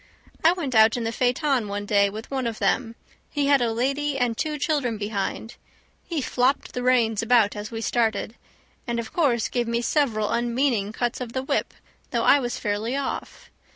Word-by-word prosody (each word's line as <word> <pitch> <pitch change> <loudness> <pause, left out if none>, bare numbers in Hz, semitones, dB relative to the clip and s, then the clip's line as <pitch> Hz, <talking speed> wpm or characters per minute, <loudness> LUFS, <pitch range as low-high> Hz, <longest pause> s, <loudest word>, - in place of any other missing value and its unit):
I 330 +2 +6
went 310 -8 -4
out 220 +1 +5
in 240 - -2
the 225 - -1
phaeton 250 0 +1
one 205 0 -4
day 200 -1 +3
with 220 +5 -8
one 260 -3 -1
of 225 -2 -4
them; 230 -3 0 0.3
he 290 -1 -1
had 280 -2 +4
a 235 -1 +1
lady 275 +5 -1
and 245 -3 0
two 305 +4 -2
children 280 -7 0
behind. 210 +2 -4 0.5
He 330 -4 -3
flopped 255 +3 0
the 250 - -3
reins 240 -4 +2
about 225 -3 +3
as 210 0 -5
we 225 -1 -5
started, 225 -2 0 0.5
and 235 -1 -1
of 230 - -6
course 255 -9 +2
gave 240 -2 -1
me 235 +1 -1
several 230 -7 +1
unmeaning 235 -3 0
cuts 240 +2 -2
with 245 -2 -6
the 260 - -2
whip, - - -1 0.3
though - - 0
I 285 - +6
was 245 -2 -3
fairly 215 +4 -2
off. 280 - -5
240 Hz, 190 wpm, -24 LUFS, 220-270 Hz, 0.5 s, I